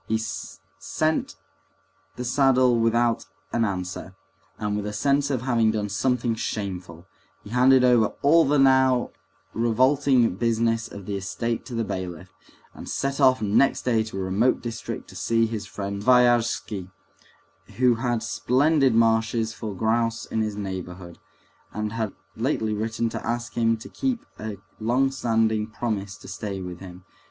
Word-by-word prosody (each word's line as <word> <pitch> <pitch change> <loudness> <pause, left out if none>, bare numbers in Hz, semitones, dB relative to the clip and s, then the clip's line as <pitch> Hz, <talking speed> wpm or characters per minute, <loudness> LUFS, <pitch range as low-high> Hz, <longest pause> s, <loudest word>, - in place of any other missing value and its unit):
He 110 - +1 0.6
sent 155 0 -1 0.8
the 125 - -5
saddle 130 -2 +3
without 115 -2 +1 0.3
an 115 - +2
answer, 95 -2 -4 0.4
and 105 -1 -2
with 105 0 -3
a 105 - -4
sense 140 +6 +1
of 130 -3 -1
having 115 -4 +2
done 105 -1 -1
something 120 +3 0
shameful; 95 -6 -5 0.4
he 105 - -11
handed 130 +1 +5
over 120 -3 +5 0.2
all 165 +4 +6
the 145 0 +2
now 130 -2 +4 0.4
revolting 125 -1 +3
business 115 0 +1
of 100 -2 -10
the 100 0 -3
estate 115 +4 -3
to 125 - -6
the 115 - 0
bailiff, 95 -3 -6 0.4
and - - -9
set 140 +1 -2
off 130 -3 +4
next 105 +7 +2
day 115 -3 +2
to 110 -3 -7
a 95 - -2
remote 100 +7 +2
district 115 -1 -6
to - - -13
see 115 0 +1
his 110 -2 -4
friend 100 0 -5
Sviazhsky, 120 -5 +2 0.9
who 125 0 +4
had 120 -1 -1
splendid 135 +2 +2
marshes 115 0 +2
for 110 -3 -6
grouse 115 +3 0
in 110 - -2
his 105 -1 -2
neighborhood, 90 -3 -6 0.5
and 105 0 -3
had 110 -3 -2 0.2
lately 110 -3 -1
written 110 +2 -1
to - - -6
ask 120 0 -3
him 115 -1 +2
to 110 - -10
keep 260 -3 -2
a 105 -2 -5 0.2
long 125 +5 +2
standing 110 -4 +1
promise 105 -3 -4
to - - -14
stay 100 -2 -5
with 90 -1 -7
him. 90 -1 -11
115 Hz, 155 wpm, -25 LUFS, 105-125 Hz, 0.9 s, all